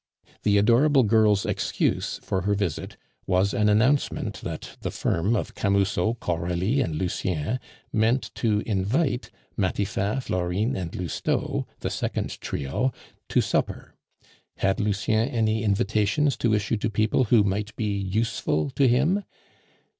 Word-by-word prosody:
The 105 -1 +3
adorable 125 +7 +5
girl's 105 -2 +3
excuse - - -1
for 95 - -1
her 100 +3 +1
visit 100 -6 -3 0.3
was 95 +2 +2
an 105 0 +2
announcement 125 +7 +1
that - - -6
the - - -2
firm 95 +8 0
of 105 - -2
Camusot, 100 +3 +1
Coralie, 90 +9 0
and 80 -10 -1
Lucien 90 +4 -1 0.3
meant 115 +4 +1
to 105 -3 +1
invite 120 - 0 0.3
Matifat, 100 +4 -1
Florine, 95 +7 -1
and 90 -6 -4
Lousteau 90 -4 -2
(the - - -2
second - - -3
trio) 70 - -1 0.4
to - - +3
supper; - - -2 0.6
had 95 +3 +1
Lucien 110 +2 +1
any 110 -1 0
invitations 105 +7 +1
to 115 -2 +2
issue 105 +2 0
to 105 +2 -1
people 110 +4 +2
who 110 -1 +5
might 105 +2 -2
be 105 -2 -1
useful 95 -7 -1
to 135 - +3
him? 150 +12 +2
105 Hz, 130 wpm, -25 LUFS, 95-115 Hz, 0.6 s, adorable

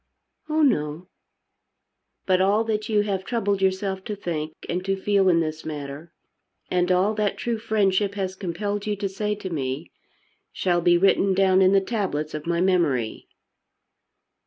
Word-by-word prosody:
"Oh 310 0 +2
no." 155 - 0 1.2
"But 185 -1 +3
all 205 +4 +3
that 215 0 -2
you 210 -1 +3
have 195 -2 -2
troubled 205 -3 -1
yourself 190 0 0
to 210 - -3
think 160 -5 -4
and 180 +1 -2
to 195 0 0
feel 195 -1 +3
in 170 -2 +4
this 155 -1 -4
matter, 150 +1 -7 0.6
and 180 0 +2
all 185 +4 +3
that 210 -2 -1
true 235 -2 -2
friendship 205 -2 +1
has 190 -2 -3
compelled 200 +3 -3
you 210 - 0
to 200 0 -2
say 210 +2 -2
to 190 -3 -7
me, 135 0 -3 0.6
shall 175 -2 0
be 175 0 +4
written 195 +1 +3
down 190 0 +4
in 185 0 +5
the 195 0 +4
tablets 190 -8 -2
of 155 +1 -6
my 170 0 +1
memory." 165 -11 +1
190 Hz, 160 wpm, -24 LUFS, 170-205 Hz, 1.2 s, in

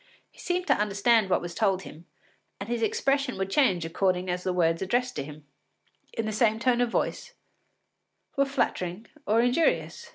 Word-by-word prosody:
He - - -22
seemed 360 0 -1
to 280 - +4
understand 210 0 +2
what - - +2
was 175 0 -6
told 195 -2 +1
him, 165 +2 -12 0.5
and 200 - -6
his 235 0 -2
expression 275 +3 0
would 195 0 -3
change 190 - +2
according 180 +1 0
as 180 0 -3
the 185 - 0
words 165 -2 +1
addressed 245 +6 0
to - - -2
him, 150 +1 -11 0.7
in 225 - -2
the 215 - -2
same 220 0 +2
tone 245 +1 +2
of 245 - +1
voice, - - -2 1.0
were 275 - +3
flattering 225 -7 -2 0.2
or 220 +2 +4
injurious. 245 +7 0
215 Hz, 175 wpm, -27 LUFS, 180-245 Hz, 1.0 s, to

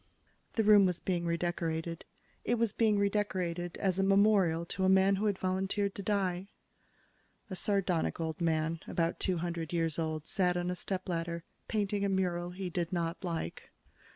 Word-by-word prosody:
The 225 - +2
room 205 -2 +7
was 180 -1 -1
being 175 -2 -1
redecorated. 170 -1 -2 0.4
It 240 - +1
was 230 -3 0
being 215 -2 +3
redecorated 185 -4 -1
as 190 -2 0
a - - +3
memorial 195 -4 +4
to 190 +2 -3
a 190 - +4
man 190 +1 +5
who 210 +2 0
had 200 -2 0
volunteered 190 +2 0
to - - -5
die. 195 -2 -1 1.0
A - - -2
sardonic 185 -4 0
old 160 0 -3
man, 160 0 +1
about 165 0 -1
two 185 -2 0
hundred 170 -1 -3
years 165 -2 0
old, 155 -1 -2
sat 180 -3 +1
on 175 0 -1
a - - -2
stepladder, 170 -3 -3 0.2
painting 205 -2 0
a 200 - +1
mural 175 -2 0
he 185 +1 -5
did 175 -1 -2
not 170 0 -2
like. 165 - -4
180 Hz, 170 wpm, -32 LUFS, 170-195 Hz, 1.0 s, room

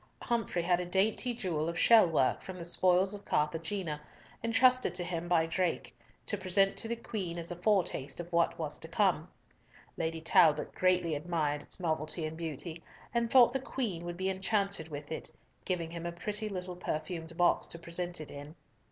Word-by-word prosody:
Humfrey 225 -7 0
had 175 0 +3
a 180 - -2
dainty 205 +7 +1
jewel 165 -8 -1
of 170 - -4
shell 225 -5 +7
work 150 -6 +2
from 190 -1 -8
the 170 - -6
spoils 185 +2 +3
of 205 0 -8
Carthagena, 160 +1 -1 0.4
entrusted 250 -3 +4
to 180 - -1
him 175 -1 -3
by 170 -2 +3
Drake 175 +1 -1 0.3
to 205 - -2
present 195 +1 +2
to - - -3
the 235 - -1
Queen 195 -7 -4
as 170 +1 -4
a - - -3
foretaste 175 -8 0
of 175 0 -7
what 170 0 +2
was - - -3
to - - -7
come. - - +1 0.7
Lady 165 0 -2
Talbot 160 -1 +4
greatly 180 -3 +2
admired 150 -1 -1
its - - -8
novelty 160 -1 -1
and 155 +1 -4
beauty, 165 +1 -5 0.3
and 235 -1 +1
thought 245 -1 +7
the 270 - +1
Queen 225 -10 -3
would 175 0 -5
be 190 +1 0
enchanted 195 -3 -1
with 145 0 -7
it, 160 - -4 0.3
giving 170 -3 -2
him 170 0 -5
a - - -3
pretty 210 +5 -4
little 180 -2 -5
perfumed 165 0 -4
box 175 -1 +3
to - - -6
present 175 +1 -3
it 155 - -7
in. 145 +2 -9
175 Hz, 185 wpm, -32 LUFS, 165-195 Hz, 0.7 s, shell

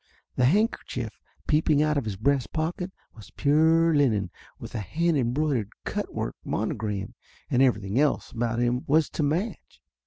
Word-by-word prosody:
The 125 - +3
handkerchief 210 - 0 0.3
peep 155 +1 +2
ing 150 -1 +4
out 150 0 +1
of 140 -5 -1
his 105 -3 -3
breast 135 +5 0
pocket 175 +4 -2 0.2
was 110 - -13
pure 160 +3 +3
linen 110 - +2 0.3
with - - -9
a 115 - -2
hand 165 - 0
embroidered 130 -3 0 0.2
cut - - -3
work - - -3
monogram, 105 0 -3 0.4
and 130 -1 +3
every 125 -5 +3
thing 100 +6 -1
else 150 -1 +1
about 115 -1 -1
him 120 +1 +1
was 155 +2 +3
to - - -2
match. 160 +10 -2
140 Hz, 165 wpm, -26 LUFS, 115-155 Hz, 0.4 s, ing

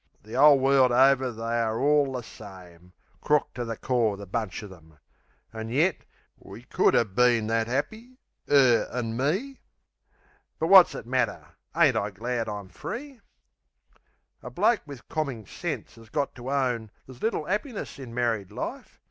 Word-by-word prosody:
The 110 +3 -9
'ole 145 +2 +7
world 135 -1 +4
over 130 +1 +4
they 115 +1 -3
are 110 0 -1
all 145 0 +3
the 125 -2 -4
same: 90 -5 -13 0.3
Crook 150 -1 +1
to 120 - -4
the 115 -2 -5
core 115 -6 0
the 100 - -9
bunch 105 0 -4
of 105 - -10
'em 80 -4 -17 0.6
an' 110 0 -6
yet 155 +9 +1 0.3
We - - -12
could - - +2
'a' 115 - +4
been 120 +2 +2
that 115 0 0
'appy, 220 - -4 0.3
'er 130 -5 +4
an' 115 -2 -3
me... 190 - -2 1.0
But, 160 - -1
wot's 190 -2 +8
it - - -7
matter? 125 -1 -1 0.3
Ain't - - +4
I 100 - -1
glad 115 +3 -3
I'm 100 -2 -6
free? 255 - -8 1.2
A - - -8
bloke 235 - +2
wiv 140 -4 -11
commin 135 -9 -3
sense 115 - -6
'as 115 -1 -16
got 140 +3 -2
to 125 +1 -8
own 125 -5 -1 0.2
There's 130 -2 -14
little 220 -8 -1
'appiness 210 - -4
in 130 -3 -9
married 115 -5 -1
life. - - -7
125 Hz, 165 wpm, -26 LUFS, 110-145 Hz, 1.2 s, wot's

